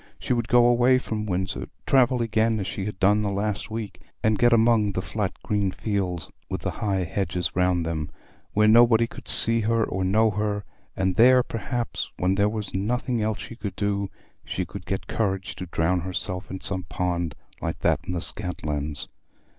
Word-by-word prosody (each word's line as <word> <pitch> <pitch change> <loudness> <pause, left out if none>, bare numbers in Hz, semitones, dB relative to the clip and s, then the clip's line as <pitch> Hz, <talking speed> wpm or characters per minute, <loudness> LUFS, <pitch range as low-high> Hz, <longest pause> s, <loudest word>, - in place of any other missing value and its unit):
She - - -1
would 120 -2 -1
go 120 0 +5
away 120 +2 +5
from 110 -4 -3
Windsor—travel 120 +7 0
again 110 0 +1
as 95 - -2
she 95 - -4
had 105 -2 -5
done 105 +3 +4
the 105 - 0
last 100 +2 -2
week, 110 -5 -6 0.2
and 110 -1 +2
get 120 0 +5
among 115 -3 +4
the 95 - -1
flat 105 -4 -2
green 105 -2 0
fields 95 -4 -3 0.2
with - - -3
the - - -2
high 95 -3 -1
hedges 90 0 -2
round 90 -1 +2
them, 80 -2 -3 0.4
where 105 +1 +4
nobody 115 +1 +6
could - - -12
see 115 0 +6
her 115 +1 +1
or 95 -2 -2
know 110 +4 +3
her; 105 0 -2 0.3
and 95 -1 0
there, 125 +2 +7
perhaps, 120 +1 -3
when 90 +1 +1
there 100 +1 +2
was 105 -1 -5
nothing 120 +4 -1
else 110 0 0
she 115 - -8
could 105 -4 -6
do, 100 -1 -1 0.3
she - - -3
should - - -9
get - - -2
courage 95 -3 -2
to 90 - -6
drown 85 +2 +1
herself 90 +1 -2
in 95 - -6
some 95 -1 -2
pond 85 -2 -2 0.3
like - - -3
that - - +2
in 90 - -5
the 85 - -2
Scantlands. 75 -5 -4
105 Hz, 185 wpm, -25 LUFS, 95-115 Hz, 0.4 s, there